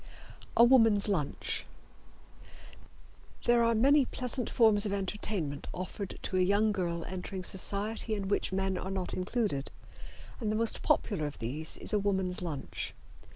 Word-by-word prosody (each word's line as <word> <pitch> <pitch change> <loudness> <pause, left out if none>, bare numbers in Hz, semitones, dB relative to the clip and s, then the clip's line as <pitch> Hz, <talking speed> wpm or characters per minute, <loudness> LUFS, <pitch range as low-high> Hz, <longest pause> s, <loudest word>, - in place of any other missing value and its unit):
A 235 - +8
Woman's 225 -5 +6
Lunch. 160 -9 -1 1.8
There 240 0 +4
are 230 0 +3
many 275 +5 +5
pleasant 250 -1 -1
forms 220 -3 +4
of 200 - -2
entertainment 190 -6 -3
offered 185 +2 -5
to 185 - -1
a - - +3
young 205 +4 +3
girl 170 -4 -2
entering 185 +1 -5
society 210 +4 -2
in 200 -2 -4
which 200 - 0
men 190 -1 -1
are 190 - -5
not 190 -2 -3
included, 185 - -1 0.7
and 215 -4 -1
the - - 0
most 225 +1 0
popular 165 -9 +1
of 145 - -8
these 145 +8 -4
is - - -3
a 210 - +3
woman's 190 -3 0
lunch. 155 -6 -5
200 Hz, 150 wpm, -31 LUFS, 180-220 Hz, 1.8 s, A